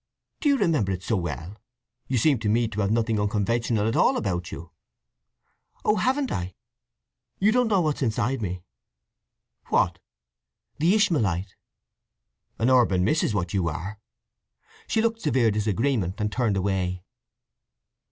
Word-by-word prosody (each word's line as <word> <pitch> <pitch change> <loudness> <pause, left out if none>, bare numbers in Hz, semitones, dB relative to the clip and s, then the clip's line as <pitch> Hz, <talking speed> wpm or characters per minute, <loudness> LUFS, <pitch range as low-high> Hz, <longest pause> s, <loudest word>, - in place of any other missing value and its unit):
"Do 295 - +1
you 280 - +4
remember 155 - +1
it 95 0 -4
so 110 - 0
well? 85 +1 -4 0.5
You 130 - 0
seem 135 +2 +3
to 110 -2 -1
me 115 +2 +2
to 105 -1 -3
have 100 - +1
nothing 110 0 +1
unconventional 110 +1 0
at 115 - 0
all - - +3
about 90 -5 -2
you." 85 0 -9 1.1
"Oh, 210 - +3
haven't 260 +6 0
I! 90 0 -4 0.8
You 205 +3 +3
don't 250 +1 +2
know 200 -4 +3
what's 155 -3 -1
inside 115 +1 0
me." 90 -3 -4 1.0
"What?" - - +1 0.8
"The 170 +6 +4
Ishmaelite." 105 - +1 1.0
"An 120 +3 +2
urban 115 -8 +4
miss 155 - +2
is 105 - 0
what 90 -3 -2
you 95 -4 +1
are." 95 +7 -6 0.9
She 220 - +1
looked 225 0 0
severe 120 -6 +2
disagreement, 105 -1 0
and 105 0 -1
turned 110 -4 0
away. 90 -2 -1
110 Hz, 145 wpm, -25 LUFS, 95-140 Hz, 1.1 s, you